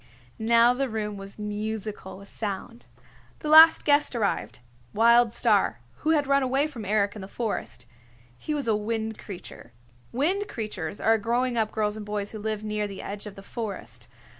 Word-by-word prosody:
Now 235 +2 +5
the 270 +1 -2
room 210 -2 -3
was 195 0 -10
musical 210 -2 -5
with 200 +1 -13
sound. 215 +3 -6 0.5
The 305 - -3
last 320 +1 +8
guest 290 -3 +3
arrived, 210 -4 -1 0.4
Wild 235 +1 +5
Star, 205 - +2 0.2
who 310 - -2
had 300 -3 +3
run 275 0 +3
away 265 +2 +1
from 255 -9 -7
Eric 205 0 +1
in 210 - -7
the 190 - -7
forest. 205 - -4 0.5
He 300 - -4
was 285 -4 -2
a 220 - +3
Wind 220 +1 -3
Creature. 175 - -10 0.4
Wind 365 - 0
Creatures 205 -5 -5
are 225 0 +3
growing 240 +3 0
up 220 -2 0
girls 210 -1 -1
and 215 - -6
boys 205 -1 -3
who 220 - -7
live 215 0 -3
near 210 -1 -2
the 195 -1 -8
edge 205 +1 -6
of 200 - -9
the 195 - -11
forest. 220 -1 -6
220 Hz, 180 wpm, -26 LUFS, 205-245 Hz, 0.5 s, last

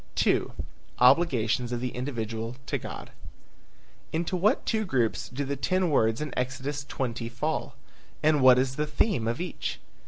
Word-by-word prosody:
II. - - +3 0.5
OBLIGATIONS 125 -4 +4
OF 120 - -1
THE 125 +1 -2
INDIVIDUAL 115 -3 -3
TO - - -1
GOD. - - -8 1.0
Into 170 +3 -1
what 195 +5 +2
two 220 -1 +1
groups 125 - 0
do 140 +3 -3
the 140 +1 -2
ten 185 +4 +1
words 115 -2 +2
in 150 -4 -4
Exodus 135 +3 -2
20 120 -4 -3
fall? 145 +2 -2 0.5
And 150 -2 +4
what 130 -1 +8
is 130 +1 0
the 150 0 0
theme 150 - +1
of 115 +1 -1
each? 180 0 -4
130 Hz, 155 wpm, -28 LUFS, 120-150 Hz, 1.0 s, what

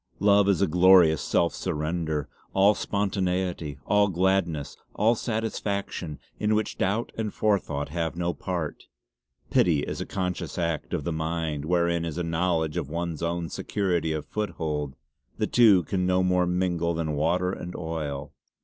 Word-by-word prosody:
Love 100 0 +4
is 95 -4 +3
a - - +3
glorious 85 -2 +6
self 85 -2 +1
surrender; 80 -1 -2 0.3
all 100 +2 +5
spontaneity; 95 -7 -1
all 105 0 +4
gladness, 90 -5 0 0.2
all 110 +3 +4
satisfaction, 100 -8 -3 0.2
in 105 0 +2
which 110 0 -2
doubt 100 +5 0
and 110 -2 -2
forethought 75 -10 0
have 80 +1 -2
no 85 0 -1
part. 85 -1 -4 0.7
Pity 80 -5 +3
is - - -4
a - - -4
conscious 90 -2 -3
act 85 -3 -2
of 75 - -3
the 85 - -2
mind; 80 -2 -2
wherein 85 0 +1
is 85 -1 -4
a 90 - -1
knowledge 80 -1 0
of 75 -5 -3
one's 85 -1 -3
own 85 0 -1
security 90 -1 -1
of 75 -2 -3
foothold. 80 -9 -3 0.4
The - - +1
two 105 -7 +5
can 90 +3 -1
no 95 0 +3
more 90 -1 +2
mingle 90 -2 0
than 80 -2 -2
water 85 +5 +1
and 90 -1 -6
oil. 75 -4 -4
85 Hz, 155 wpm, -26 LUFS, 80-95 Hz, 0.7 s, glorious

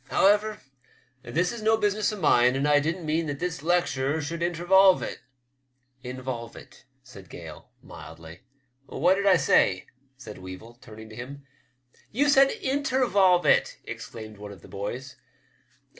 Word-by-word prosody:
However, 210 +2 +2 0.6
this 170 +7 -1
is 235 -2 -7
no 220 +1 +3
business 210 +1 0
of 210 - -7
mine, 125 -5 +4
and 140 +2 0
I 145 0 +5
didn't 165 +3 -3
mean 160 +1 -1
that 145 -1 -4
this 165 -2 -4
lecture 160 -4 0
should 165 +3 -5
inter 170 0 -2
volve 190 0 +5
it." - - -6 0.5
" 130 0 -43
Involve 125 -2 -6
it," - - -15 0.2
said 100 -8 -14
Gale, 80 -3 -11
mildly. 80 +2 -12 0.3
" 125 +2 -45
What 175 +6 +2
did 200 +1 -1
I 190 -3 +6
say? 95 - +2 0.2
" 135 -1 -40
said 110 -7 -11
Weevil, 95 +6 -11
turning 110 0 -12
to 110 - -12
him. 140 +4 -9 0.3
" 125 0 -34
You 290 0 +4
said 270 -1 +6
intervolve 255 - +1
it! - - +2
" - - -41
exclaimed 110 -2 -9
one 105 0 -9
of 95 -4 -14
the - - -13
boys. 120 +7 -6
140 Hz, 175 wpm, -26 LUFS, 120-185 Hz, 0.6 s, I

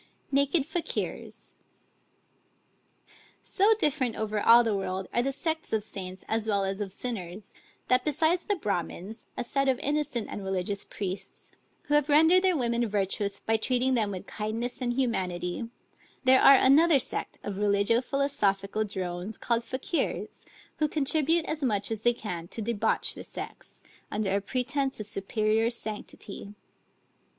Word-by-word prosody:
NAKED 280 +2 +3
FAKIERS 325 +2 -4 1.9
So 415 +3 +3
different 275 - +1
over 215 -1 -2
all 235 +2 +7
the 225 -3 0
world 190 -1 -3
are 240 - +3
the 270 +3 0
sects 320 +1 -1
of 215 -1 +1
saints 185 -2 -7
as 220 0 0
well 200 -2 +1
as 195 +2 -3
of 200 -2 -3
sinners, 200 -3 -5 0.3
that 255 0 +3
besides 315 +5 +1
the 410 - +1
Bramins, 205 - -4
a - - -1
set 275 +3 0
of 260 - +2
innocent 285 -5 -1
and 205 - -6
religious 190 +1 -2
priests, 195 -1 -6 0.3
who 295 - -3
have 295 0 +3
rendered 320 +5 +6
their 370 -3 +3
women 235 -2 +1
virtuous 200 0 -1
by 225 0 +1
treating 255 +3 +1
them 220 -4 +1
with 190 -2 -6
kindness 225 +4 -4
and 240 -1 0
humanity, 190 -4 -2 0.5
there 260 0 +6
are 275 - +9
another 290 +4 +6
sect 265 - -2
of 200 -1 -4
religio 205 +3 +3
philosophical 215 -8 0
drones, 190 0 -4
called 235 -1 0
Fakiers, 260 +7 -3 0.3
who 305 - +2
contribute 310 +2 +1
as 310 0 -3
much 210 -5 0
as 220 -2 -3
they 240 +1 +4
can 175 -7 -5
to 225 - -6
debauch 225 0 0
the - - -8
sex, - - -9 0.3
under 205 -2 -1
a 200 - +1
pretence 270 +4 -1
of 215 - -4
superior 215 +3 0
sanctity. 210 -3 -6
230 Hz, 150 wpm, -28 LUFS, 200-275 Hz, 1.9 s, are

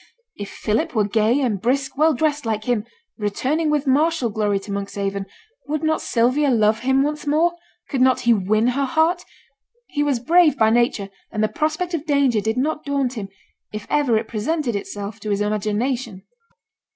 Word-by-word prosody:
If 205 - -7
Philip 220 +3 -2
were 210 -2 +2
gay, 220 +6 +2
and 215 -8 -1
brisk, 270 +4 0
well 310 +1 +3
dressed 295 +1 0
like 220 -2 -2
him, 230 -2 0 0.3
returning 265 +10 0
with 300 -1 +1
martial 285 -2 +2
glory 205 -1 0
to 200 +1 -8
Monkshaven, 200 0 -3 0.4
would 305 +2 -2
not 315 0 +1
Sylvia 255 +5 +2
love 220 -3 +3
him 265 +2 +2
once 300 +1 -3
more? 320 +4 +3 0.3
Could 265 - -2
not 260 0 +4
he 240 -1 +4
win 215 +3 +2
her 275 +3 0
heart? 325 +6 +1 0.6
He 290 - -3
was 285 -4 +1
brave 320 +3 +4
by 220 -2 +4
nature, 230 -4 +1 0.2
and 215 - -1
the - - +3
prospect 310 - -2
of 315 -2 -3
danger 275 -7 +2
did 220 +3 -1
not 300 +4 -1
daunt 275 -3 -1
him, 205 -5 -6 0.4
if 215 0 -6
ever 275 -7 +3
it 220 0 -3
presented 240 +3 -2
itself 200 +1 -5
to 215 - -6
his 200 -1 0
imagination. 215 +1 -2
245 Hz, 180 wpm, -21 LUFS, 215-290 Hz, 0.6 s, not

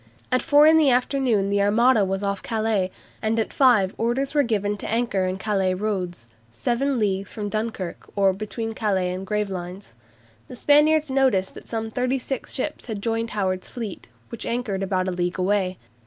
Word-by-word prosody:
At 255 - +3
four 295 -1 +5
in 320 +1 +7
the 305 -3 +5
afternoon 245 -5 +1
the 200 0 +2
Armada 220 +3 +4
was 195 +1 -2
off 200 -1 -1
Calais, 215 -4 0 0.3
and 220 +1 0
at 220 - -2
five 225 -8 +4
orders 250 +5 0
were 295 - +4
given 210 -5 0
to - - -5
anchor 225 -5 0
in 185 +1 -2
Calais 190 -2 0
roads, 180 - -3 0.2
"seven 245 - -1
leagues 200 -3 -1
from 210 -2 -4
Dunkirk," 215 -4 -4
or 195 -1 +3
between 215 +3 -5
Calais 195 -5 0
and 185 +1 -5
Gravelines. 195 - -4 0.5
The - - -9
Spaniards 300 +2 +4
noticed 260 -9 +2
that - - -12
some 225 -1 -3
thirty 255 +3 0
six 265 0 -5
ships 255 - -3
had 220 -4 -4
joined 225 +2 -1
Howard's 185 -2 -1
fleet, 220 - -7 0.2
which 235 - -7
anchored 235 -5 -2
about 185 -1 0
a - - 0
league 180 0 -2
away. 185 -1 0
210 Hz, 180 wpm, -24 LUFS, 190-245 Hz, 0.5 s, in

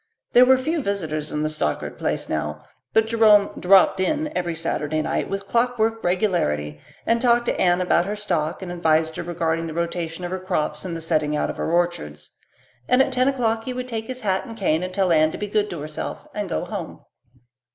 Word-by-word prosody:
There 250 +1 +8
were 260 +1 +6
few 315 +5 -1
visitors 160 - -3
at 150 0 -1
the - - +1
Stockard 155 0 -2
place - - -2
now, 75 -1 -3 0.3
but 220 - +3
Jerome 220 -3 +5
"dropped 190 +1 +5
in" 300 +10 -1
every 175 -2 -1
Saturday 155 -1 -2
night - - -2
with 195 0 -2
clockwork 225 0 0
regularity 75 - 0 0.2
and 230 0 +2
talked 240 -1 +3
to - - -1
Anne 175 0 +3
about 180 0 +2
her 205 - -2
stock 175 -4 -2
and 180 - -6
advised 160 -2 +1
her - - -2
regarding 165 -1 -2
the 160 - -7
rotation 170 0 -3
of 175 - -5
her 185 - -2
crops 155 -5 -2
and 170 -2 -4
the - - -7
setting 155 -2 0
out - - 0
of - - -11
her - - -2
orchards. 170 - -2 0.5
And 250 - +4
at 265 - +3
ten 255 +1 +2
o'clock 230 -4 0
he 255 - -3
would 250 0 -5
take 225 -2 -4
his 255 0 -6
hat 190 -2 0
and 230 -3 -9
cane 170 -6 +1
and 185 0 -4
tell 185 -1 +1
Anne 155 -1 +4
to - - -5
be 210 - -3
good 210 0 0
to 170 -4 -6
herself, 155 +1 -6
and 205 -3 -3
go 170 - -2
home. 190 -4 -6
185 Hz, 215 wpm, -23 LUFS, 160-225 Hz, 0.5 s, There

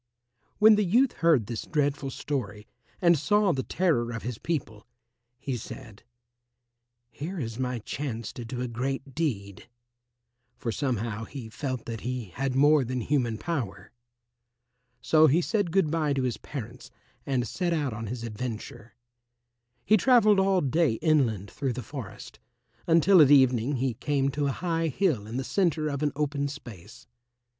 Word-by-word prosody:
When 215 0 +7
the 210 - +3
youth 235 +8 +3
heard 160 -10 +3
this 115 +1 -4
dreadful 145 -2 -1
story 110 -7 -4 0.4
and 170 -3 +5
saw 205 +4 +3
the 135 - -1
terror 130 -9 0
of 115 - -5
his 120 -2 -5
people, 120 -10 -4 0.5
he 135 0 -4
said, 110 -2 -9 1.1
"Here 165 +11 -6
is 115 -3 -5
my 125 -1 -1
chance 115 0 -5
to 120 - -7
do 125 +2 -5
a 125 - -2
great 135 +3 -4
deed," 115 - -3 0.9
for 115 - -3
somehow 115 -3 -2
he 125 -4 -8
felt 130 0 -4
that 115 -2 -5
he 125 -4 -4
had 135 +3 -2
more 145 +1 +5
than 125 +1 -3
human 120 -3 0
power. 130 - -4 1.1
So 155 0 +5
he 155 +4 +4
said 200 +1 0
good 175 -4 +2
bye 155 -3 +1
to 135 -1 -1
his 125 -2 -1
parents 125 -2 -8 0.4
and 130 -3 0
set 180 -2 -2
out 145 -7 0
on 110 +1 -5
his 120 +2 -5
adventure. 115 0 -6 0.9
He 215 - +5
travelled 215 -2 +5
all 190 -1 +3
day 150 0 +2
inland 115 - +1
through 135 -3 -2
the 125 +1 -6
forest, 130 -9 -9 0.5
until 170 +2 +6
at 145 - +6
evening 130 -1 +4
he 130 0 0
came 140 +3 0
to 145 +1 -1
a - - +1
high 165 +2 -1
hill 145 - 0
in 115 +3 -5
the 130 - -2
centre 160 -3 0
of 140 -1 -3
an 150 -1 +1
open 145 -1 -1
space. 120 - -11
135 Hz, 160 wpm, -27 LUFS, 120-155 Hz, 1.1 s, When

